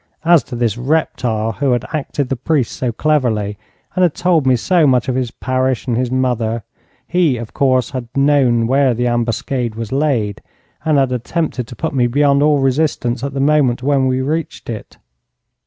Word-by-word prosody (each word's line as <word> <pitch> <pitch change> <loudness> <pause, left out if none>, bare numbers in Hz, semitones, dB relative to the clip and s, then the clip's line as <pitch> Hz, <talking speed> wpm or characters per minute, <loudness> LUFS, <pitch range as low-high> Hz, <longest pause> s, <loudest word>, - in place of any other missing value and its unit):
As 170 -2 +6
to - - -7
this 120 -1 -1
reptile, 125 -6 0
who 130 +3 0
had 120 +1 -1
acted 145 -3 -2
the 135 - 0
priest 135 0 0
so 125 -2 -2
cleverly 110 -7 0 0.4
and 185 - +1
had 175 -4 +3
told 175 -6 +2
me 130 - +5
so 165 +5 +2
much 125 -3 +2
of 130 - 0
his 125 -1 -1
parish 130 +1 -1
and 125 -3 -1
his 125 +1 0
mother, 120 -3 -1 0.4
he, 170 -7 +2
of 115 -1 -8
course, 130 -3 +1
had 130 -3 -5
known 135 -5 +3
where 130 0 +2
the 120 +2 -1
ambuscade 120 0 -1
was 115 -1 -6
laid, 130 -8 0 0.4
and 155 -2 +2
had 135 -2 +2
attempted 125 0 -2
to 120 - -10
put 160 - -3
me 125 -3 +2
beyond 140 +2 +2
all 150 0 +4
resistance 135 -3 0
at 140 0 -4
the - - -1
moment 135 -4 +2
when 135 -1 +2
we 130 0 0
reached 155 -3 -3
it. 110 - -8
130 Hz, 190 wpm, -17 LUFS, 120-145 Hz, 0.4 s, As